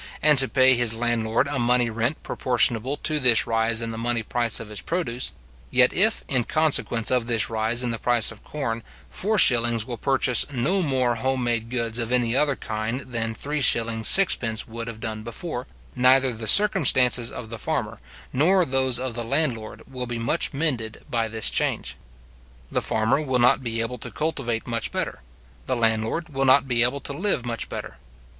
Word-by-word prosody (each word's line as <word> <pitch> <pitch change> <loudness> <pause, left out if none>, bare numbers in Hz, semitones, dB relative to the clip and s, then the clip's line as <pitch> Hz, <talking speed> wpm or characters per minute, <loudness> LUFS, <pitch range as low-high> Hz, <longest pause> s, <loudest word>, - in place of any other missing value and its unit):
and 150 -3 +6
to 135 - +6
pay 130 0 +5
his 120 -2 +1
landlord 115 0 0
a 140 -1 -3
money 120 0 +2
rent 115 +6 -3
proportionable 125 +2 +1
to 155 0 +2
this 125 -5 +4
rise 115 0 +1
in 115 - -4
the 110 - -6
money 115 -1 -1
price 120 0 -1
of 115 - -9
his 105 -2 -5
produce; 130 -9 -3 0.4
yet 125 0 +3
if, 220 +4 +2
in 130 -4 +1
consequence 135 -5 +1
of 125 -2 0
this 115 -2 +1
rise 110 +2 -1
in 120 - -2
the 115 - -4
price 120 -3 +1
of 110 - -14
corn, 115 -6 -4 0.3
4s. 120 - +3
will 120 -1 -6
purchase 130 -1 +2
no 145 +10 0
more 130 -6 0
home 130 +1 -1
made 115 -1 -2
goods 115 -1 -2
of 115 0 -2
any 120 -1 +1
other 145 0 +2
kind 110 +3 -4
than 115 -1 -2
3s. 145 +5 -3 0.4
6d. 115 - +1
would 115 +1 -7
have 115 -2 -7
done 110 -1 -5
before, 125 +3 -7 0.3
neither 130 0 +3
the 110 0 -6
circumstances 130 - +4
of 115 -2 -9
the 115 - -7
farmer, - - -4 0.3
nor 180 +6 +3
those 130 -2 +3
of 130 -1 -4
the 120 0 -4
landlord, 115 -3 -2
will 125 -2 -6
be 120 -1 -4
much 115 +9 -1
mended 135 -7 -2
by 115 -2 -1
this 110 0 0
change. - - -1 0.8
The - - 0
farmer 110 +7 0
will 130 -4 -1
not 125 +2 +3
be 115 -2 -3
able 120 +1 -4
to - - -4
cultivate 135 -7 -3
much 115 -3 -3
better; - - -4 0.5
the 130 - 0
landlord 115 +8 -1
will 135 -2 -2
not 135 +1 +4
be 120 -2 0
able 125 +4 +1
to 140 - -4
live 150 - 0
much 115 -1 -3
better. - - -7
120 Hz, 185 wpm, -23 LUFS, 115-135 Hz, 0.8 s, and